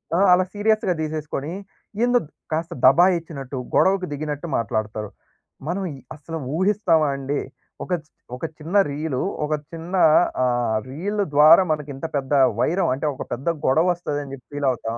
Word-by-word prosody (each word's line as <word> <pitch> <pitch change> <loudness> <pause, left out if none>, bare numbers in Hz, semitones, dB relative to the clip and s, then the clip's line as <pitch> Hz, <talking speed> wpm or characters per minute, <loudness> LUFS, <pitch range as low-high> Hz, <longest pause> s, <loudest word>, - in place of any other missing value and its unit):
ఆ! 180 - +2
అలా 185 - +4
సీరియస్‌గా 210 -2 +1
తీసేసుకొని, 155 -1 -4 0.5
ఎందో 245 0 +4 0.3
కాస్త 165 +2 -2
దబాయించినట్టు, 160 -3 +3 0.2
గొడవకు 190 -1 +3
దిగినట్టు 150 +2 -4
మాట్లాడతారు. 110 -1 -3 0.6
మనం 185 +4 -2
ఈ 135 - -10 0.2
అసలు 160 +2 -7 0.2
ఊహిస్తామా 185 -6 +2
అండి? 140 +1 -2 0.4
ఒక 185 - -3
చి 155 - -32 0.3
ఒక 145 - -5
చిన్న 165 +5 -6
రీల్ 145 -2 -3 0.3
ఒక 155 - -2 0.2
చిన్నా 170 +3 -2 0.4
ఆహ్! 120 -3 +1
రీల్ 200 +10 -2
ద్వారా 155 +5 +8
మనకు 150 -1 -2
ఇంత 135 - -6
పెద్ద 140 0 -1 0.3
వైరం 175 +5 +1
అంటే 140 +4 -3
ఒక 135 - -6
పెద్ద 130 +7 -2 0.2
గొడవ 160 +6 +3
వస్తదని 145 -5 -4
చెప్పి 125 -2 -11
ఫీల్ 145 -1 -1
అవుతాం. 115 -1 -4
155 Hz, 150 wpm, -22 LUFS, 135-175 Hz, 0.6 s, ద్వారా